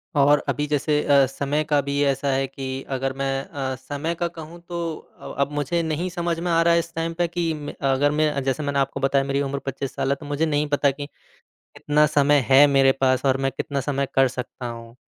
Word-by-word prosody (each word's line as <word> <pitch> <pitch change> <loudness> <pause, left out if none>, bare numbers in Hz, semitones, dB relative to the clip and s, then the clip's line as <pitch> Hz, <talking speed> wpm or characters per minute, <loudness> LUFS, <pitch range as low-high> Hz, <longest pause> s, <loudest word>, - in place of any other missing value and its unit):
और 145 +1 +5
अभी 145 - 0
जैसे 150 0 +1
अ, 140 -1 +5
समय 140 +3 -2
का 145 -1 +4
भी 140 +1 -2
ऐसा 140 0 0
है 135 +1 +1
कि 135 0 -8 0.3
अगर 135 +1 -2
मैं 135 0 -2
अ, 135 -2 -4
समय 145 +6 -4
का 170 +1 -1
कहूँ 165 0 -10
तो 175 -1 -4 0.4
अ - - -8
अब 140 - -5
मुझे 150 +4 -1
नहीं 160 +3 -2
समझ 170 -1 -2
में 175 +1 -2
आ 165 0 +4
रहा 170 0 +4
है 170 - +4
इस 170 0 -6
टाइम 165 0 -2
पे 175 +1 0
कि 170 -1 -1
म 150 -1 -6 0.2
अगर 145 +2 +2
मैं 155 0 +2
अ, 140 - -2
जैसे 135 +2 -1
मैंने 140 -1 0
आपको 135 0 -1
बताया, 135 0 +2
मेरी 140 +1 -1
उम्र 140 0 -2
25 135 0 -4
साल 135 - -1
है, 140 - +2
तो 145 - -12
मुझे 145 +2 0
नहीं 150 -1 0
पता 145 -1 +2
कि 145 +1 -7 0.7
कितना 150 +1 +3
समय 145 0 +3
है 135 +2 +8
मेरे 135 -1 +4
पास 130 0 +2
और 135 0 +3
मैं 135 0 +1
कितना 140 -1 -2
समय 140 0 -1
कर 135 -1 +4
सकता 125 -1 -6
हूँ 115 0 -8
145 Hz, 240 wpm, -23 LUFS, 135-155 Hz, 0.7 s, है